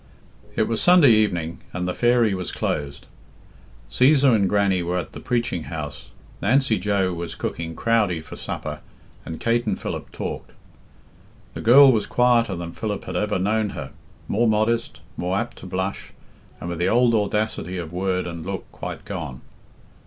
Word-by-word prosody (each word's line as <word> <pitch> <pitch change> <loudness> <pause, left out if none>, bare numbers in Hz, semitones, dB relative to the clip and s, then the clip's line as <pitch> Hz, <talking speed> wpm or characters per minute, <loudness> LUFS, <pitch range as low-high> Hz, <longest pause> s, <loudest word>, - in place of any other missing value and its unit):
It - - +3
was 115 -1 -1
Sunday 175 -7 +7
evening, 90 -7 +1
and 90 0 -2
the 90 - -1
"Fairy" 120 -2 +3
was 90 -2 -3
closed. 70 -1 -3 0.8
Csesar 135 0 +4
and 100 -4 +3
Grannie 100 -3 +2
were 90 +1 -1
at 90 - -4
the - - -9
preaching 120 -9 -1
house, 75 -3 -6 0.3
Nancy 120 -1 +2
Joe 95 -1 +1
was 85 -1 -5
cooking 80 -1 -4
crowdie 105 -7 +1
for - - -10
supper, - - -5 0.5
and 80 - -6
Kate 120 0 +1
and 100 - -1
Philip - - -5
talked. - - -6 1.0
The - - -6
girl 135 +4 +8
was 110 -4 0
quieter 120 -5 +3
than 85 -1 -6
Philip 105 +3 -4
had - - -6
ever 105 -1 0
known 105 +3 +1
her - - -6 0.4
more 115 +3 +2
modest, 110 +2 0 0.2
more 90 +2 -1
apt - - -3
to - - -10
blush, 95 +2 -4 0.5
and - - -6
with 85 -1 -4
the 90 - +2
old 120 0 +4
audacity 105 -4 -1
of 85 -2 -6
word 90 0 -1
and 85 -2 -6
look 95 +1 -6
quite - - -7
gone. 65 0 -6
100 Hz, 165 wpm, -23 LUFS, 90-115 Hz, 1.0 s, girl